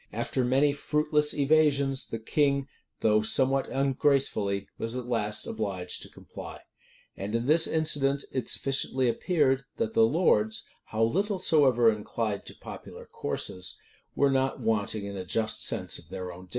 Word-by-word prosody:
After 120 +3 -2
many 135 +4 +3
fruitless 150 +1 +1
evasions, 140 -2 +2
the 115 - -4
king, 140 +4 0 0.3
though 105 -1 +3
somewhat 135 +4 +1
ungracefully, 135 -7 +1
was 115 +2 -4
at 125 -1 -4
last 105 -4 0
obliged 95 -4 -4
to - - -6
comply.[] - - -11 0.5
And 100 +3 -4
in 115 +1 -1
this 160 +4 +6
incident 145 -3 +2
it 125 -4 -3
sufficiently 135 -1 0
appeared, 135 +1 +1
that 225 -1 -2
the 230 - +3
lords, 110 - +1 0.2
how 110 0 -1
little 195 - 0
soever 130 -10 +4
inclined 105 -1 -4
to - - -8
popular - - -10
courses, 90 0 -4 0.4
were 140 -1 +3
not 135 +1 0
wanting 110 -2 -1
in 100 0 -6
a 95 - -5
just 110 +4 -1
sense - - +1
of - - -18
their 90 -1 -6
own 90 +1 -11
dignity. - - -25
130 Hz, 155 wpm, -28 LUFS, 110-145 Hz, 0.5 s, this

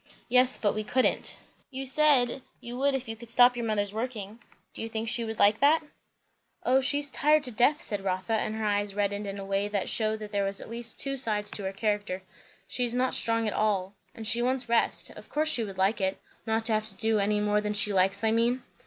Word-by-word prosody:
"Yes, 250 +1 +6
but 205 - 0
we 215 - -3
couldn't." 255 +4 +2 0.3
"You 270 0 -6
said, 270 -3 +4 0.2
you 240 +1 -8
would 275 +2 +1
if 260 -2 -4
you 225 - -5
could 230 +1 -12
stop 245 +1 +6
your 235 -1 -3
mother's 205 -2 -1
working. 220 -2 -5 0.3
Do - - -8
you 225 - -4
think 225 0 -4
she 235 +1 0
would 220 -1 -5
like 205 +1 +4
that?" 310 +3 +4 0.8
"O 260 +2 +4
she's 285 +1 0
tired 300 +2 +3
to 250 - -2
death!" 250 +7 +2
said 205 -3 -4
Rotha; 185 +3 -2
and 220 0 -1
her 220 0 -3
eyes 205 -1 -1
reddened 205 0 -1
in 200 0 -5
a 195 - -6
way 195 +1 -1
that 205 -2 -2
shewed 220 -1 +1
there 205 -1 -2
were 195 - 0
at 195 +3 -7
least 235 -1 -2
two 275 0 -1
sides 210 -5 -2
to 200 - -6
her 190 - -2
character. 205 -2 -2 0.4
"She 250 - -1
is 240 0 -1
not 255 +1 +1
strong 230 -1 0
at 210 - -1
all, 200 -3 0 0.2
and 225 - -8
she 230 +2 +1
wants 255 0 0
rest. 230 0 0
Of - - -13
course 310 +1 +1
she 240 -7 +1
would 195 -3 -7
like 195 +3 +1
it. 190 0 0 0.3
Not 225 0 0
to 225 - +1
have 215 0 0
to 205 - -10
do 220 -1 +1
any 210 +1 +1
more 210 0 +1
than 210 0 -3
she 205 0 +1
likes, 195 +2 +1
I 220 - +3
mean." 240 +3 +1
220 Hz, 240 wpm, -28 LUFS, 205-245 Hz, 0.8 s, Yes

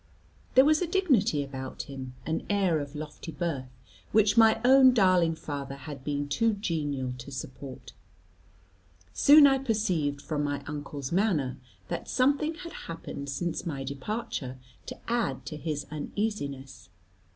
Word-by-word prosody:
There 260 +1 +8
was 310 +2 +4
a 360 - 0
dignity 285 - +2
about 130 -1 -6
him, 130 -2 -8
an 160 0 -1
air 190 -6 +2
of 145 0 -6
lofty 155 +2 -7
birth, 150 -7 -3 0.4
which 210 -1 +4
my 225 -1 +6
own 260 0 +7
darling 185 -6 +4
father 140 -3 -5
had 140 -1 -9
been 145 0 -2
too 220 +10 +1
genial 145 - -2
to 125 - -8
support. 130 0 -8 1.2
Soon 290 - +8
I 270 -1 +5
perceived 185 - 0
from 150 0 -2
my 145 -1 -2
uncle's 145 -2 -5
manner, 170 - +1 0.3
that - - -4
something 285 +5 +2
had 335 +1 -9 0.2
happened 140 -3 -6
since 170 +5 -3
my 140 -4 -3
departure 140 - -4 0.3
to - - -6
add 170 - -1
to 150 - -6
his 150 -2 -3
uneasiness. 145 - -4
155 Hz, 140 wpm, -28 LUFS, 140-220 Hz, 1.2 s, There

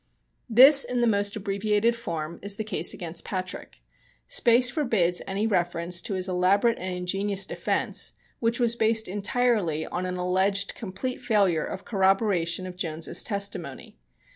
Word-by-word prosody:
This, 270 +5 +8
in 250 - -3
the 240 - +2
most 205 -2 +1
abbreviated 210 +3 0
form, 170 -7 -6
is 200 0 -4
the 220 - -4
case 215 - 0
against 170 -2 -5
Patrick. 185 -2 -6 0.4
Space 250 - +4
forbids 220 - 0
any 195 +2 -2
reference 175 -3 -1
to 195 - -4
his 185 0 -1
elaborate 195 +6 +1
and 185 0 -4
ingenious 195 +2 0
defense, - - -1 0.3
which 235 +1 0
was 235 -1 +2
based 220 -1 +2
entirely 205 - 0
on 180 +1 -4
an 180 0 -4
alleged 190 +3 0
complete 235 +5 -6
failure 195 -8 +1
of 190 - -7
corroboration 190 -3 +1
of 180 -1 -9
Jones's 165 -3 0
testimony. 200 - -4
195 Hz, 145 wpm, -25 LUFS, 180-225 Hz, 0.4 s, This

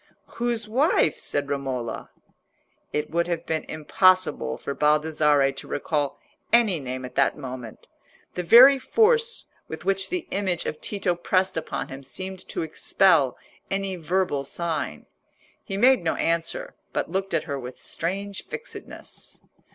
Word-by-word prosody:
"Whose 235 -2 -1
wife?" 265 +10 +2
said 145 -1 -2
Romola. 135 -4 -3 0.8
It 150 0 -2
would 170 +1 +1
have 170 -1 -2
been 160 -1 -2
impossible 155 - +2
for 140 - -4
Baldassarre 150 -2 +3
to 135 - -9
recall 145 -1 -2 0.3
any 220 -7 +4
name 130 -1 -5
at 125 - -9
that 135 - +2
moment. 125 -5 -8 0.5
The 180 - -2
very 255 +10 +8
force 460 - +2 0.2
with - - -8
which 195 0 0
the 360 -2 -2
image 190 -4 -1
of 155 - -4
Tito 195 -3 0
pressed 185 +2 +1
upon 160 - -4
him 135 +1 -8
seemed 185 +7 -5
to - - -3
expel 160 -3 +3 0.3
any 195 -1 -2
verbal 170 -4 0
sign. 155 - -3 0.6
He 195 - -4
made 250 -2 +5
no 160 - 0
answer, 170 - -1 0.2
but - - -2
looked 190 -1 -1
at 160 - +1
her 140 -2 -4
with 125 0 -8
strange 195 +4 -4
fixedness. 470 +2 -9
170 Hz, 145 wpm, -25 LUFS, 145-195 Hz, 0.8 s, very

